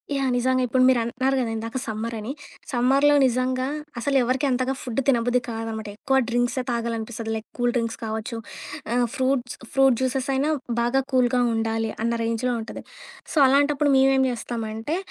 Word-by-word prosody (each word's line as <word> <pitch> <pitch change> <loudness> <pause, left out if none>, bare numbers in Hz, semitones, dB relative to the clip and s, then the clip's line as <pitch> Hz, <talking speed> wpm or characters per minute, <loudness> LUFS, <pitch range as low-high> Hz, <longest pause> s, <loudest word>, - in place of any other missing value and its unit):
Yeah! 270 -1 +1
నిజంగా 255 +1 +2
ఇప్పుడు 255 +2 +3
మీరంటున్నారు 255 +2 +1
కదా! 235 -3 -1
ఇందాక 230 +3 -4
సమ్మర్ 225 +1 -3
అని, 215 +5 -5 0.4
సమ్మర్‌లో 270 +4 +4
నిజంగా, 255 +1 0 0.3
అసలు 275 +4 -1
ఎవరికీ 255 +4 0
అంతగా 255 +1 0
ఫుడ్ 250 0 -3
తినబుద్ధి 245 0 +3
కాదనమాట. 225 -1 -4
ఎక్కువ 265 +3 +1
డ్రింక్సే 245 +2 0
తాగాలనిపిస్తది, 230 -1 -3
లైక్ 220 0 -6
కూల్ 245 0 +2
డ్రింక్స్ 230 -1 -2
కావచ్చు, 220 +2 -4 0.6
ఆహ్, 245 -1 +3
ఫ్రూట్స్ 260 -1 0 0.2
ఫ్రూట్ 270 -3 +4
జ్యూసెస్ 260 +1 -1
అయినా 280 +3 +1 0.3
బాగా 240 +3 +2
కూల్‌గా 250 -1 +3
ఉండాలి 225 0 -1
అన్న 235 - +1
రేంజ్‌లో 230 +2 0
ఉంటది. 220 - -8 0.5
సో, - - -4
అలాంటప్పుడు 285 +1 +3
మేమేం 265 0 +4
జేస్తామంటే, 230 +4 -4
245 Hz, 150 wpm, -24 LUFS, 230-265 Hz, 0.6 s, సమ్మర్‌లో